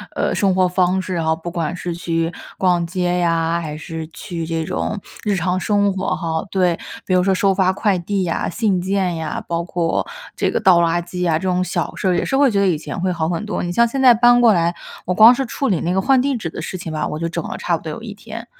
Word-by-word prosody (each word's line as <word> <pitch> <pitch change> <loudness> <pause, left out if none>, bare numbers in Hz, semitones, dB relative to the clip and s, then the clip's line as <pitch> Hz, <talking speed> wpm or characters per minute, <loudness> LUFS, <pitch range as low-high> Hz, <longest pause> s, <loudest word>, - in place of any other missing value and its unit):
呃， - - 0
生 195 -2 +2
活 185 -1 +3
方 185 +1 +1
式， 185 - -5
然 170 -2 -1
后 160 0 +2
不 165 +2 -7
管 170 -1 -2
是 175 -1 -4
去 165 0 -2 0.2
逛 175 -2 +2
街 180 0 -1
呀， 165 0 +1
还 150 -2 -5
是 160 +1 -6
去 170 -3 -6
这 160 -1 -2
种 210 +5 -3 0.2
日 210 -2 +1
常 180 0 0
生 205 -1 +1
活 190 - -2
哈。 160 -1 -2
对， 180 -3 +2 0.3
比 185 - -1
如 180 0 +4
说 195 0 +2
收 195 +1 +2
发 190 -1 +2
快 200 0 +1
递 190 +2 -2
呀、 165 - -1
信 195 -3 0
件 185 -2 0
呀， 160 -1 -4
包 170 0 -1
括 170 -1 -1 0.3
这 - - 0
个 - - 0
倒 185 -5 +5
垃 170 +1 +1
圾 180 +1 -7
呀， 165 -2 +1
这 - - -10
种 180 0 +1
小 180 - -3
事 195 - -2
儿 180 - +3
也 - - 0
是 270 - -1
会 275 -2 +4
觉 200 - +1
得 200 - +3
以 165 -4 +2
前 160 - -6
会 185 0 0
好 160 -1 -1
很 180 +5 -2
多。 210 - -3
你 175 - -2
像 235 +5 +3
现 270 +3 -3
在 255 -2 +8
搬 240 +1 +5
过 235 -2 +6
来， 170 -1 +1 0.3
我 180 - 0
光 220 +6 +8
是 270 +1 -2
处 275 +3 -2
理 185 -6 +1
那 175 +2 -1
个 190 - +1
换 260 +3 +3
地 275 0 0
址 195 -9 -4
的 160 - -7
事 185 - -5
情 170 -2 -6
吧， 155 -1 -2
我 150 - -4
就 165 +1 -2
整 - - -3
了 - - -5
差 - - 0
不 - - -16
多 - - -5
有 - - -7
1 - - -7
天， - - -9
180 Hz, 290 characters per minute, -19 LUFS, 170-195 Hz, 0.3 s, 在